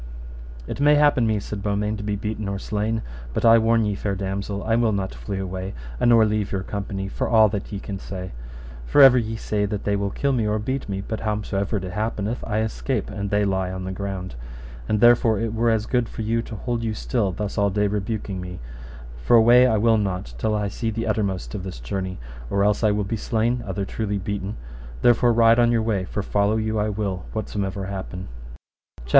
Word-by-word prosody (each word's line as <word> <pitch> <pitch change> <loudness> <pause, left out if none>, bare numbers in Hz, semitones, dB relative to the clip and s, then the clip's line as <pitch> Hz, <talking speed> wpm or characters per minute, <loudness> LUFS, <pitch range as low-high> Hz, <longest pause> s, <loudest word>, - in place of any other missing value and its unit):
It - - -6
may 145 +1 +5
happen 145 -5 +4
me, 110 -1 +1
said 100 0 -6
Beaumains, 105 +1 -1
to - - -5
be 105 0 -1
beaten 105 +1 -4
or 100 - -2
slain, 105 +3 -2 0.3
but - - 0
I 115 0 +8
warn 115 0 +3
you, 105 -1 -1
fair 100 0 -2
damosel, 100 +1 -3
I 115 +1 +1
will 115 -2 +2
not 95 -1 -2
flee 100 -2 -5
away, 95 0 -4 0.2
a - - +2
nor 115 -2 +6
leave 105 -1 -1
your 95 -1 -2
company, 100 -1 -4
for - - -3
all 110 -2 +6
that 100 -1 -4
ye 100 - -4
can 100 0 -6
say; 95 -1 -6 0.6
for - - +3
ever 135 -2 +9
ye 110 -1 -3
say 105 -1 -1
that 100 0 -3
they 100 - +1
will 100 0 -1
kill 140 +7 0
me 115 -5 +1
or 105 0 +1
beat 130 +3 -3
me, 95 0 -2
but 110 +2 -4
howsomever 105 -1 -1
it 95 - -4
happeneth 110 +2 -2
I 110 0 0
escape, 110 0 -2
and 100 -1 -3
they 105 0 +2
lie 95 -2 0
on 95 0 -5
the 95 - -4
ground. 95 -1 -5 0.6
And 105 -1 +1
therefore 120 -2 +5
it 115 -1 -2
were 115 +1 +2
as 110 -1 +1
good 125 -1 0
for 110 - -5
you 115 +2 0
to 115 - -8
hold 115 +2 -3
you 110 -1 -2
still 110 -6 0
thus 100 +2 -4
all 100 0 +2
day 105 +1 +1
rebuking 100 -1 -2
me, 90 0 -7 0.7
for 120 - +5
away 120 +2 +7
will 115 +2 +4
I - - +4
not 90 - -2
till 110 -1 0
I 105 -1 0
see 110 +3 -3
the 115 +1 -3
uttermost 100 -3 -1
of 105 - -4
this 90 -9 -7
journey, 95 +10 -4 0.3
or 100 0 +1
else 105 +2 +2
I 110 - +5
will 105 0 +1
be 105 +3 -3
slain, 115 +3 0
other 95 0 -2
truly 105 0 -2
beaten; 100 +1 -4 0.5
therefore 120 0 +5
ride 115 0 +5
on 120 0 +4
your 115 -2 +2
way, 105 -4 0
for 100 +2 -3
follow 105 +2 +1
you 110 0 -1
I 105 +1 +1
will 100 -4 -3
whatsomever 100 -2 -3
happen. 95 -1 -6
CHAPTER - - -17
VIII. - - -13
105 Hz, 225 wpm, -23 LUFS, 100-115 Hz, 0.7 s, ever